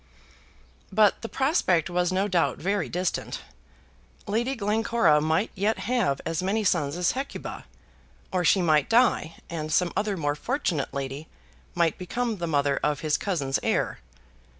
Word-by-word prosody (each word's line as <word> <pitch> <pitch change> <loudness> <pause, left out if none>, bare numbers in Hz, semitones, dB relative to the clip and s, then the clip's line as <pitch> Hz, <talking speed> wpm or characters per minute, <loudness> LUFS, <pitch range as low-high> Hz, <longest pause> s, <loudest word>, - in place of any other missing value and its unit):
But 210 +1 +4
the 230 - -5
prospect 265 - +2
was 180 0 0
no 190 +2 +1
doubt 180 -4 +1
very 195 0 -1
distant. 180 +1 -2 0.8
Lady 235 +6 0
Glencora 220 - +2
might 160 +7 +1
yet 210 +3 0
have 230 - 0
as 165 0 -1
many 205 +4 0
sons 165 -5 +1
as 180 -1 +2
Hecuba. 270 +3 -6 0.7
Or 185 -1 0
she 180 +3 +4
might 155 -4 +3
die, 230 -8 +3
and 155 -2 -4
some 175 +2 +2
other 205 0 0
more 145 -3 0
fortunate 175 - -2
lady 140 +2 -5 0.5
might 170 -2 +1
become 230 +5 -2
the 170 -2 -3
mother 145 -2 +1
of 150 -1 0
his 155 -2 +1
cousin's 145 -9 -1
heir. - - 0
180 Hz, 150 wpm, -26 LUFS, 155-215 Hz, 0.8 s, But